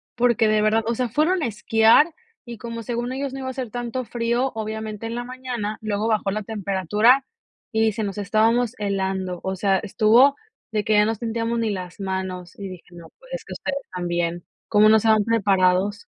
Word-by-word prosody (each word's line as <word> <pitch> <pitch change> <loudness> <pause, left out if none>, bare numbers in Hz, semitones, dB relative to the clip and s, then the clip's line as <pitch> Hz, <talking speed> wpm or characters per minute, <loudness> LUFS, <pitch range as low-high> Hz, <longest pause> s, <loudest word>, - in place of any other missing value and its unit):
porque 235 -2 +3
de 215 0 +2
verdad, 220 +1 +2
o 235 - 0
sea, 250 -1 -1
fueron 315 - +1
a - - +1
esquiar, 225 +6 +4 0.4
y 235 -2 -9
como 230 +1 -6
según 240 +1 -3
ellos 270 0 -3
no 270 - -5
iba 260 - -5
a - - -2
hacer 255 -3 -5
tanto 245 +2 -4
frío, 240 +3 -1
obviamente, 220 0 -5
en 230 - -4
la 240 0 -3
mañana, 245 -4 -5
luego 215 0 -1
bajó 215 -3 +1
la 215 +1 -2
temperatura, 210 - +2 0.5
y 220 -1 +1
dice: 220 0 0
"Nos 200 0 -4
estábamos 225 +3 +2
helando". 190 -2 -2
O 190 0 -2
sea, 195 0 +2
estuvo 230 +7 +4 0.4
de 210 -1 0
que 215 - +1
ya 210 0 +5
no 225 - +1
sentíamos 230 +1 -2
ni 225 -1 0
las 185 -1 -5
manos, 190 -2 -4
y 200 -1 -6
dije: 185 -2 -11
"No, 170 -1 -12
pues, - - -14
es - - -5
que - - -8
ustedes 275 -1 -4
también, 175 -1 -2 0.3
¿cómo 215 0 +5
no 220 0 +6
se 225 - +1
van 215 -1 +5
preparados?" 200 - +2
220 Hz, 205 wpm, -23 LUFS, 200-240 Hz, 0.5 s, no